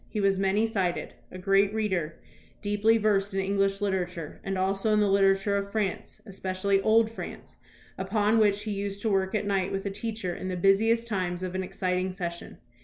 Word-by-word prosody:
He 215 - -3
was 195 -1 +2
many 195 +3 +2
sided; 190 -6 -2 0.2
a - - -8
great 195 +1 +3
reader, 185 -7 -1 0.5
deeply 205 +2 +3
versed 200 -2 +1
in - - +1
English 195 +1 0
literature, 180 -5 -3
and 195 0 -2
also 195 +3 0
in 210 - +4
the 210 - +3
literature 195 0 +3
of 200 0 -4
France, 205 -4 -3
espe 190 -1 -5
cially 195 +1 +2
old 220 0 +4
France, 225 - -9 0.4
upon 210 +3 +2
which 205 -1 +3
he 215 - -3
used 200 0 -4
to 220 - +1
work 190 +1 +1
at 210 - 0
night 195 -2 0
with 195 +1 -3
a 200 - -1
teacher 215 -3 -3
in 185 - -6
the 185 -1 -3
busiest 220 +5 +3
times 185 -5 -2
of 185 -1 -4
an 190 - -1
exciting 185 0 -2
session. 170 -2 -6
195 Hz, 195 wpm, -27 LUFS, 190-210 Hz, 0.5 s, in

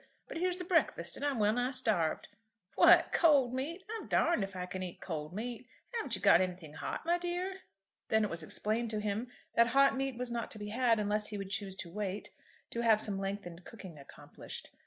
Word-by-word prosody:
But - - -6
here's 360 +1 0
the 365 - -4
breakfast, 310 - +1
and - - -6
I'm 285 -3 0
well 210 -1 +3
nigh 245 +2 0
starved. 220 - +1 0.5
What, - - +6
cold 280 -7 +5
meat! 315 +9 -3
I'm 450 +1 -6
darned 340 -12 +2
if 195 0 -6
I 180 0 -3
can 185 +1 -6
eat 180 -2 -6
cold 155 -4 -5
meat. 235 +4 -5 0.3
Haven't 460 -2 -1
you - - -6
got - - +7
anything 180 -4 -4
hot, 155 - -5
my 345 +1 +2
dear?" 355 +2 -3 0.5
Then 220 0 +3
it 210 - 0
was 170 0 -2
explained 220 +8 -1
to 215 -1 -1
him 210 +3 -2 0.3
that 235 0 +5
hot 275 +4 +4
meat 270 -2 -2
was 250 0 -3
not 235 -1 -3
to - - -7
be 210 0 -6
had, 230 0 +2
unless 210 0 0
he 210 - -5
would 195 -1 -6
choose 200 -2 -3
to 170 -3 -7
wait, 205 -1 -4 0.4
to 235 - -2
have 225 -2 +5
some 205 -2 -2
lengthened 195 -3 -5
cooking 185 -9 -11
accomplished. 140 - -10
220 Hz, 215 wpm, -33 LUFS, 195-265 Hz, 0.5 s, got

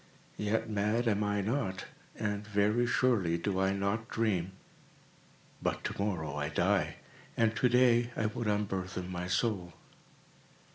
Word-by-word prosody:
Yet, 110 +2 0
mad 105 +3 0
am 105 -1 +2
I 105 0 0
not—and 105 -2 -3
very 105 +4 +2
surely 110 -10 +2
do 95 +2 -1
I 95 0 +3
not 100 +3 -1
dream. 95 -5 0 1.1
But - - -1
to - - -3
morrow 80 -8 -2
I 75 0 -1
die, - - +1 0.4
and 115 -1 +3
to 125 - +3
day 120 -1 +4
I 110 - 0
would 110 +1 -2
unburthen 95 -3 -2
my 90 0 -3
soul. 90 -2 0
105 Hz, 135 wpm, -32 LUFS, 95-115 Hz, 1.1 s, day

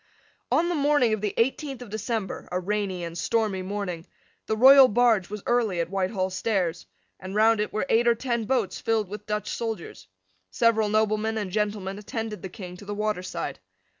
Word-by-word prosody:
On 340 - +3
the 350 - 0
morning 290 -6 +3
of 215 - -2
the 210 -2 -2
eighteenth 265 +1 -1
of 220 - -13
December, 220 -2 -4
a 180 - 0
rainy 195 -1 -2
and 170 0 -6
stormy 210 +1 0
morning, 185 -3 -4 0.4
the 220 - 0
royal 265 +2 +9
barge 225 -5 +3
was 210 -1 -6
early 230 -7 +1
at 170 +1 -2
Whitehall 190 0 -1
stairs; 185 -4 -1 0.3
and 190 +1 -7
round 220 +1 +4
it 210 - -1
were 215 - -1
eight 235 0 +3
or 235 - +5
ten 235 -1 -2
boats 240 -4 0
filled 220 -3 0
with 210 +1 -8
Dutch 210 -1 -2
soldiers. 225 -6 -5 0.4
Several 220 - +2
noblemen 215 +1 +1
and 205 -4 -3
gentlemen 205 -1 -2
attended 220 0 -5
the 190 - -6
King 180 -2 -9
to 205 - -12
the 205 +1 -4
waterside. 210 -3 -3
210 Hz, 185 wpm, -26 LUFS, 190-230 Hz, 0.4 s, royal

